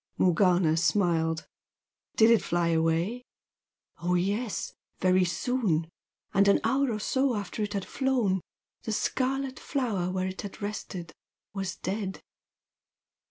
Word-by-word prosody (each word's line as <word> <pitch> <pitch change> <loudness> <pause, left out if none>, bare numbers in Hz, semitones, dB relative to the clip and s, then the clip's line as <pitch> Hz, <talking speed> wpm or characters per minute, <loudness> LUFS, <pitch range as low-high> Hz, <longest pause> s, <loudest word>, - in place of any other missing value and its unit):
Morgana 180 -2 +3
smiled. 165 -2 +1 0.7
"Did 220 +1 +6
it 230 - +5
fly 170 -1 0
away?" 165 +8 +1 0.8
"Oh, 180 +1 +1
yes. 200 +3 -1 0.3
Very 185 0 +4
soon! 175 -3 0 0.4
And 200 0 +4
an 200 - +5
hour 260 +3 +2
or 215 - -1
so 260 +4 +1
after 205 +1 -4
it 205 0 -2
had 200 -2 -2
flown, 245 -9 +1 0.4
the 220 - -3
scarlet 265 +3 -1
flower 210 -10 -1
where 185 0 -1
it 190 0 -5
had 205 0 -8
rested 195 -5 -5 0.4
was 195 -2 -3
dead." 195 0 -3
195 Hz, 125 wpm, -28 LUFS, 175-225 Hz, 0.8 s, Did